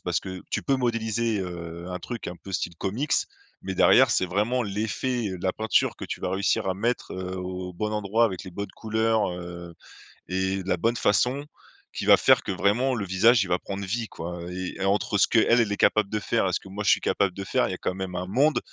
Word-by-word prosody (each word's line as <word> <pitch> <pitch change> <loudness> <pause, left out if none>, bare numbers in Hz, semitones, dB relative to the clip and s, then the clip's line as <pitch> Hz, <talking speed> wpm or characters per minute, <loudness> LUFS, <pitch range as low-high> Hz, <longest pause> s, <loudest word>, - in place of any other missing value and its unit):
Parce 90 -2 0
que 95 +1 -7
tu - - -1
peux 135 - +2
modéliser, 115 -3 0
heu, 85 -2 -6
un 90 0 -4
truc 120 +5 -6
un 90 - -5
peu 90 +3 -12
style 85 -2 -2
comics, 115 - -2 0.5
mais 95 0 -4
derrière, - - +6
c'est 95 - +2
vraiment 105 +7 0
l'effet, 110 +3 -2
heu, 95 -1 -5
de - - -9
la 95 - +2
peinture 110 0 +1
que - - -7
tu - - -5
vas 90 - -2
réussir 95 0 0
à 95 - 0
mettre, 115 +5 -2
heu, 95 0 -5
au 90 0 -5
bon 105 +4 -3
endroit, 105 +2 +2
avec 95 -5 -2
les 95 - -9
bonnes 100 +3 -6
couleurs, 110 -1 +1
heu 85 -1 -8 0.6
et 95 +1 -1
de 95 - -7
la 90 - +2
bonne 115 +6 +1
façon, 125 +7 +1 0.5
qui - - -4
va - - +8
faire - - +4
que - - -3
vraiment 105 +8 +1
le 100 -4 -3
visage, 100 +4 +4
il - - -6
va 90 - +2
prendre 100 0 -5
vie, 115 +4 -2
quoi. 85 +1 -6
Et 90 0 -5
entre 100 0 +1
ce - - +5
qu'elle 115 -3 +4
est 100 - -1
capable 105 -2 +3
de 105 - -1
faire 110 0 0
et - - 0
ce - - +1
que - - -14
moi 105 +2 -5
je 105 - +2
suis - - +4
capable 100 -3 +1
de 100 - -6
faire, - - +1
il - - -3
y - - -4
quand - - -2
même 95 -1 -5
un 90 0 -3
monde. 145 +9 +3
100 Hz, 245 wpm, -26 LUFS, 90-110 Hz, 0.6 s, va